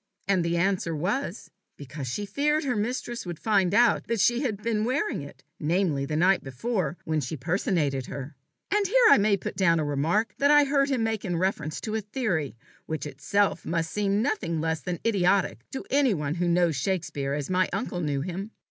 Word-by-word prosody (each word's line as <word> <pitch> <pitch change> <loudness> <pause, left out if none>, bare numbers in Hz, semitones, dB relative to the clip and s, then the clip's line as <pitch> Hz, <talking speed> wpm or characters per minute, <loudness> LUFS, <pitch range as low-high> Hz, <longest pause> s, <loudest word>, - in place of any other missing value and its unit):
And 190 -3 +2
the 170 0 0
answer 175 -2 0
was, 195 - -3 0.3
"Because 140 -1 -7
she 205 +12 -3
feared 300 +9 +1
her 255 -5 0
mistress 240 +2 -3
would 175 -3 -6
find 195 -2 +2
out 240 -2 +3
that 230 -2 -1
she 240 +4 +3
had 215 -7 -2
been 220 -2 0
wearing 260 - -1
it 140 - -11 0.2
namely, 160 -3 +1
the 150 - -2
night 180 +4 +3
before, 175 - -2
when 155 -1 0
she 140 +4 -4
personated 150 - 0
her." 140 +2 -7 0.4
And 410 0 +2
here 485 +4 +5
I - - +7
may 200 0 +3
put - - -6
down 170 -4 +3
a 155 - 0
remark 160 +10 0
I 295 +1 +6
heard 280 0 +2
him 255 -5 +1
make 220 -2 -1
in 175 -4 -2
reference 165 -4 -1
to 215 - -4
a 220 - 0
theory 205 - -2 0.3
which 160 -1 -3
itself 150 +8 0
must 165 -1 -2
seem 205 0 +1
nothing 175 - -1
less 160 0 -1
than 175 +4 -3
idiotic 195 - +2
to 265 - -6
any 270 -6 +3
one 150 -2 -2
who 175 +1 -1
knows 170 -2 +2
Shakespeare 145 -4 -2
as 145 +3 -4
my 185 0 +2
uncle 175 - -3
knew 145 -3 -1
him. 185 +6 -5
185 Hz, 200 wpm, -26 LUFS, 160-220 Hz, 0.4 s, I